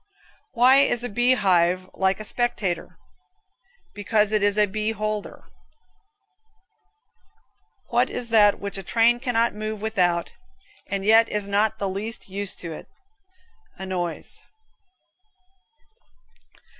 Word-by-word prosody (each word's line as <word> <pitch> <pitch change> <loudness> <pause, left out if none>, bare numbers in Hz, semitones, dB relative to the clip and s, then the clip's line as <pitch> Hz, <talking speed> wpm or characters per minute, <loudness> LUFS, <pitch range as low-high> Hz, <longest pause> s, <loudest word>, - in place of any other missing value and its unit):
Why 255 +2 +5
is 245 -4 +3
a 245 - -3
bee 240 +4 +2
hive 185 -3 +2
like 190 +1 0
a 215 - -7
spectator? 195 -8 -2 1.0
Because 210 +1 0
it 215 -1 +1
is 205 0 +2
a 210 - +5
beeholder 215 0 -4
(beholder). - - -29 2.4
What - - +2
is 240 -1 -5
that 210 -3 +4
which 200 -1 -5
a - - -4
train 230 +5 +2
cannot 235 -3 0
move 215 0 -5
without, 180 -6 0 0.6
and 195 -1 -3
yet 225 +2 +5
is 210 -1 -2
not 205 +2 0
the 200 - -2
least 205 +4 -5
use 200 +1 -3
to 170 - -8
it? 155 - -9 0.9
A 190 - -7
noise. 180 -3 -4
210 Hz, 120 wpm, -23 LUFS, 195-225 Hz, 2.4 s, Why